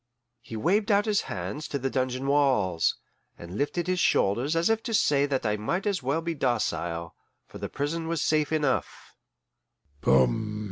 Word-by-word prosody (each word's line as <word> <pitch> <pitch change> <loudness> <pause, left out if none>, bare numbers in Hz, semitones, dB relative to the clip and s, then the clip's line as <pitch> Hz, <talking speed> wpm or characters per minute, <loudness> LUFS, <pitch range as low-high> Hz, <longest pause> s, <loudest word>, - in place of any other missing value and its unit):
He 115 - -7
waved 200 - +1
out 205 +1 +4
his 210 -2 +2
hands 100 - -4
to 140 - -2
the 135 0 -2
dungeon 130 0 -1
walls, 130 - +2 0.4
and 85 +2 -9
lifted 145 +7 -1
his 185 0 0
shoulders 125 +5 +2
as 165 +1 +2
if 225 0 +2
to 230 -2 -2
say 145 -6 +3
that 135 -3 -1
I 105 0 +1
might 170 - -2
as 200 -5 0
well 140 +6 0
be 170 0 -2
docile, 85 - -1 0.3
for - - -11
the - - -4
prison 160 +3 -3
was 165 -2 -1
safe 155 -1 +1
enough. 155 -2 -1
145 Hz, 170 wpm, -27 LUFS, 120-170 Hz, 0.4 s, out